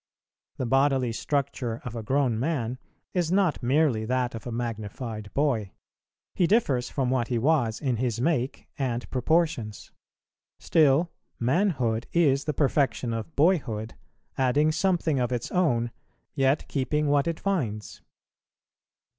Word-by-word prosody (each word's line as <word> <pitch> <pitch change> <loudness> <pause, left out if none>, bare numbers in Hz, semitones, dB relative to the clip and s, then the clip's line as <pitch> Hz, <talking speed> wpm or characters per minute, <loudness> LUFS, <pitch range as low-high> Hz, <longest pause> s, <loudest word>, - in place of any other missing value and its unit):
The 130 - -2
bodily 135 -1 +2
structure 130 -2 -2
of 120 -1 -5
a 115 - -3
grown 130 0 +1
man 130 -4 -2 0.3
is 175 -3 0
not 185 -4 +2
merely 130 -3 +2
that 125 +1 0
of 115 +1 -7
a - - -4
magnified 110 -2 -5
boy; 125 -9 0 0.6
he 175 - +2
differs 140 - +2
from 130 -3 -1
what 125 -3 +1
he 120 - -1
was 120 -3 +1
in 130 -5 -1
his 120 -1 -1
make 130 -2 -1
and 125 -3 -2
proportions; 130 - 0 0.7
still 160 +2 +3 0.3
manhood 125 - +1
is 145 -5 +3
the 150 - -1
perfection 135 -4 +1
of 115 +8 -5
boyhood, 135 - +1 0.5
adding 145 +4 +3
something 165 -4 +1
of 125 0 0
its 120 -1 -3
own, 120 -10 +1 0.4
yet 135 0 +1
keeping 150 +2 0
what 145 +1 +2
it 165 -1 -2
finds. 125 - -2
130 Hz, 135 wpm, -26 LUFS, 120-155 Hz, 0.7 s, still